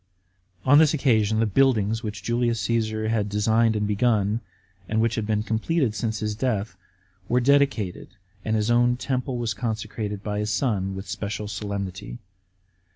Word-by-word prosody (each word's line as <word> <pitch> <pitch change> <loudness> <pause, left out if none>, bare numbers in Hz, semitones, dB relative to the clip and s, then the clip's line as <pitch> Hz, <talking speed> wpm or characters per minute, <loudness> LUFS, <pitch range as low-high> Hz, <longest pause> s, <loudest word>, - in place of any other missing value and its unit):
On 145 +3 +7
this 155 -1 +4
occasion 110 -6 +2
the 115 - +3
buildings, 110 -1 +2
which 105 -4 -6
Julius 120 -1 0
Cassar 110 -2 0
had 105 -2 0
designed 110 +2 +2
and 105 0 0
begun, 105 0 +1 0.5
and 110 - +1
which 115 0 +2
had 110 -3 -2
been 105 -1 0
completed 115 +3 0
since 110 -1 -3
his 105 0 -1
death, 110 -3 -2 0.5
were 125 - +3
dedicated, 135 -7 +1 0.4
and 110 - 0
his 110 +2 +1
own 120 +1 +3
temple 130 -1 -2
was 115 -2 -1
consecrated 105 -1 -4
by 105 -1 -2
his 105 0 -2
son 100 -4 0
with 95 +1 -7
special 105 +1 -4
solemnity. 100 - -5
110 Hz, 155 wpm, -24 LUFS, 105-120 Hz, 0.5 s, On